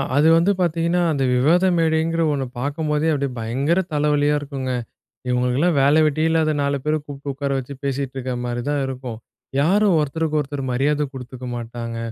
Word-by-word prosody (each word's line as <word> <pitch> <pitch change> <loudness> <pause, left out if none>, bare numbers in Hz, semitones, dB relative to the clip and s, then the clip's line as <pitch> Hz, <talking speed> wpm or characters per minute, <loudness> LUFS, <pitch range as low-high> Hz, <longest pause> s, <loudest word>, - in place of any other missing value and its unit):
அது 145 +2 +4
வந்து 175 +4 +3
பார்த்தீங்கன்னா, 170 +1 +1
அந்த 140 -3 0
விவாத 165 +9 +4
மேடைங்குற 165 0 +1
ஒண்ண 140 -2 -1 0.2
பார்க்கும்போதே 150 +3 -1
அப்படியே 140 -2 -1
பயங்கர 135 +10 0
தலைவலியா 150 0 +2
இருக்குங்க. 135 -3 -4 0.6
இவங்களுக்கெல்லாம் 125 +7 +1
வேல 140 +2 +4
வெட்டியே 155 +2 +1
இல்லாத 160 -1 +2
4 140 0 0
பேர 150 +1 +1
கூப்பிட்டு 140 0 -6
உட்கார 140 +1 -3
வச்சு 135 +2 -7
பேசிட்டு 135 -1 -2
இருக்கற 130 -1 -3
மாரி 120 0 -2
தான் 145 -1 0
இருக்கும். 125 -3 -6 0.4
யாரும் 195 +5 +3
ஒருத்தருக்கு 155 +1 -1
ஒருத்தர் 145 -1 -4
மரியாத 145 +4 +1
கொடுத்துக்க 130 -1 -8
மாட்டாங்க. 115 0 -5
145 Hz, 160 wpm, -21 LUFS, 130-160 Hz, 0.6 s, அது